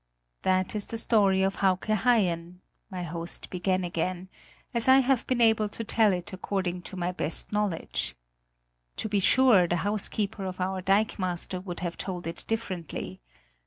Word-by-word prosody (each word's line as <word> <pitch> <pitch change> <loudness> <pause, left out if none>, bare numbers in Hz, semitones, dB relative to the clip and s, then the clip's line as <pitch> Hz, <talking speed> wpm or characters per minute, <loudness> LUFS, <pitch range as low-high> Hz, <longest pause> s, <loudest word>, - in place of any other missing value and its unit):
"That 185 0 +1
is 210 -2 -2
the 230 - -4
story 200 -4 +3
of 195 0 0
Hauke 190 -2 +1
Haien," 185 -6 +1 0.3
my 185 -3 -5
host 170 0 -5
began 185 0 0
again, 180 +1 -3 0.4
"as 235 0 -1
I 260 0 +8
have 265 -1 +1
been 255 -2 0
able 220 -2 +4
to 230 - -5
tell 220 -1 +3
it 180 +2 -4
according 185 -1 -2
to 190 - -9
my 175 0 -1
best 165 -3 0
knowledge. 190 - -1 0.8
To - - -1
be 205 -1 +1
sure, 215 -3 +5
the 175 - 0
housekeeper 205 0 -1
of 185 0 -5
our 185 +1 -1
dikemaster 185 -2 0
would 175 -3 -6
have 175 -1 -4
told 180 -3 -5
it 165 - -5
differently. 180 - -4
190 Hz, 160 wpm, -27 LUFS, 180-215 Hz, 0.8 s, I